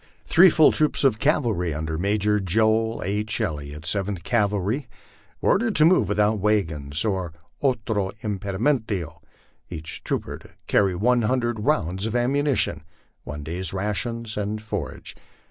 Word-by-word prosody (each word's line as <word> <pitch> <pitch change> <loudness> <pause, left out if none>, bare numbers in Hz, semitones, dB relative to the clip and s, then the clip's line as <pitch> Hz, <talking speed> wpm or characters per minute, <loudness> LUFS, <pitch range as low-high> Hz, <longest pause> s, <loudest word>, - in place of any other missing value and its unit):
Three 185 +3 +7
full 160 -2 +5
troops 155 -1 +2
of 125 -6 +3
cavalry 115 - +1
under 80 +1 -3
Major 105 +4 +1
Joel 110 +4 +1
II. 105 +2 -1 0.2
Elliot, 75 0 -4
7th 95 +2 -1
Cavalry, 105 - 0 0.5
were - - +3
ordered 225 +1 +1
to 155 - +6
move 180 +3 +4
without 105 +1 +2
wagons 80 -8 0
or 95 -6 -2 0.3
otro 110 -7 0
impedimienlo, 100 - -2 0.5
each 80 -2 -7
trooper - - -3
to - - -16 0.2
carry 95 -3 +2
one 120 +6 +2
hundred 120 0 0
rounds 100 - 0
of 110 - -4
ammunition, 135 +1 +1 0.4
one 75 +1 -6
day's 90 +6 -2
rations 110 +3 -3
and 105 +1 -3
forage. 105 - -5
105 Hz, 135 wpm, -24 LUFS, 90-120 Hz, 0.5 s, Three